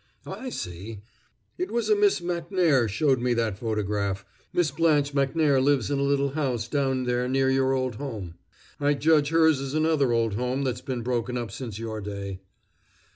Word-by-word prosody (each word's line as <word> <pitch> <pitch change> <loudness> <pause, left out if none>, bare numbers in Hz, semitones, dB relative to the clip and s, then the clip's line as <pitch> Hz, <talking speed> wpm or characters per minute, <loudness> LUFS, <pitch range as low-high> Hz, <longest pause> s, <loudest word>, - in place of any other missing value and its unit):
"I 260 - -6
see. 100 - -7 0.6
It 365 - -1
was 235 0 -1
a 425 - +4
Miss 410 - +3
Macnair 170 - +1
showed 130 +5 +2
me 125 -1 +1
that 110 -4 -1
photograph 105 -3 -2 0.3
Miss 175 -5 +1
Blanche 145 -2 +2
Macnair 140 0 +2
lives 140 -1 +2
in 140 - +1
a - - 0
little 140 0 +2
house 130 -6 -2
down 135 -1 0
there 125 0 0
near 135 0 +2
your 135 0 +2
old 130 -4 -1
home. 110 -11 -6 0.5
I 145 0 +2
judge 150 0 +3
hers 160 -3 +4
is 135 +1 -4
another 155 -4 +2
old 115 -2 +1
home 125 +5 -1
that's 125 -2 -2
been 125 -3 -4
broken 125 0 -1
up 120 -2 -4
since 115 -6 -6
your 110 -1 -5
day." 100 -2 -6
130 Hz, 180 wpm, -26 LUFS, 115-145 Hz, 0.6 s, a